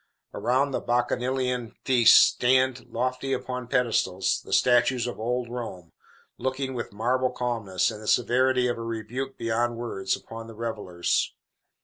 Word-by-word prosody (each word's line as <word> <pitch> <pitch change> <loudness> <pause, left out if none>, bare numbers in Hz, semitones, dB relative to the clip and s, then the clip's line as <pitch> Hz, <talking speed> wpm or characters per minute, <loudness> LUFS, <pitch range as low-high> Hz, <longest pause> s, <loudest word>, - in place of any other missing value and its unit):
Around 135 +3 +1
the - - -1
bacchanalian 125 0 -1
feast 125 -4 +7
stand, 130 0 +2
lofty 130 +3 -2
upon 125 -1 -4
pedestals, 115 -7 +1
the - - -12
statues 125 0 +3
of 120 - -5
old 120 +2 -1
Rome, 115 -9 -7 0.5
looking, 130 +1 -2
with 120 - -5
marble 125 +5 0
calmness 115 -7 -1
and 105 - -9
the 110 - -9
severity 125 +2 +3
of 120 -1 -2
a - - -4
rebuke 115 +4 -5
beyond 115 +1 -1
words, 95 -5 -2
upon 115 0 -9
the 115 - -11
revellers. 105 -6 -2
120 Hz, 140 wpm, -26 LUFS, 115-130 Hz, 0.5 s, feast